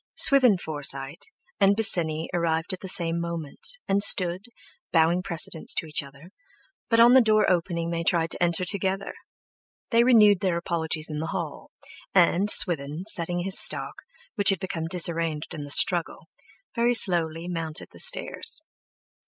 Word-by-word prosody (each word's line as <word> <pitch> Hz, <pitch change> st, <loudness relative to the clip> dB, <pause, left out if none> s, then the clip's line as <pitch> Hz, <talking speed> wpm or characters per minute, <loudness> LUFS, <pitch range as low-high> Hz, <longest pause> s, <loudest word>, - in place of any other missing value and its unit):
Swithin 255 Hz, -7 st, +5 dB
Forsyte, 145 Hz, -3 st, -4 dB, 0.3 s
and 200 Hz, +1 st, +3 dB
Bosinney 165 Hz, -7 st, +4 dB
arrived 165 Hz, 0 st, -2 dB
at 185 Hz, -, -7 dB
the 190 Hz, -, -10 dB
same 170 Hz, -2 st, -1 dB
moment,—and 170 Hz, -, -4 dB
stood—bowing 180 Hz, -3 st, +1 dB
precedence 170 Hz, -3 st, -2 dB
to -, -, -3 dB
each 155 Hz, -1 st, -1 dB
other,—but 230 Hz, -, -8 dB
on 235 Hz, +1 st, +6 dB
the 260 Hz, -, +6 dB
door 215 Hz, -2 st, +1 dB
opening 170 Hz, -1 st, -2 dB
they 170 Hz, 0 st, -4 dB
tried 165 Hz, -1 st, 0 dB
to -, -, -3 dB
enter 175 Hz, +1 st, 0 dB
together; 195 Hz, +1 st, -2 dB, 0.8 s
they 230 Hz, 0 st, +3 dB
renewed 215 Hz, -6 st, +4 dB
their 185 Hz, -3 st, -2 dB
apologies 160 Hz, -2 st, -4 dB
in 150 Hz, -, -5 dB
the 160 Hz, -, -5 dB
hall, -, -, -7 dB, 0.5 s
and, 185 Hz, +2 st, +2 dB
Swithin, 155 Hz, -4 st, +3 dB
settling 175 Hz, -4 st, -1 dB
his 195 Hz, +1 st, +2 dB
stock, -, -, -2 dB, 0.3 s
which 200 Hz, -, +4 dB
had 195 Hz, -3 st, 0 dB
become 165 Hz, -4 st, -6 dB
disarranged 165 Hz, -3 st, -2 dB
in 145 Hz, -2 st, -8 dB
the -, -, -12 dB
struggle, 175 Hz, +4 st, +1 dB, 0.5 s
very 240 Hz, +1 st, +1 dB
slowly 170 Hz, -5 st, -1 dB
mounted 165 Hz, -3 st, -4 dB
the -, -, -16 dB
stairs. -, -, 0 dB
175 Hz, 145 wpm, -24 LUFS, 160-200 Hz, 0.8 s, on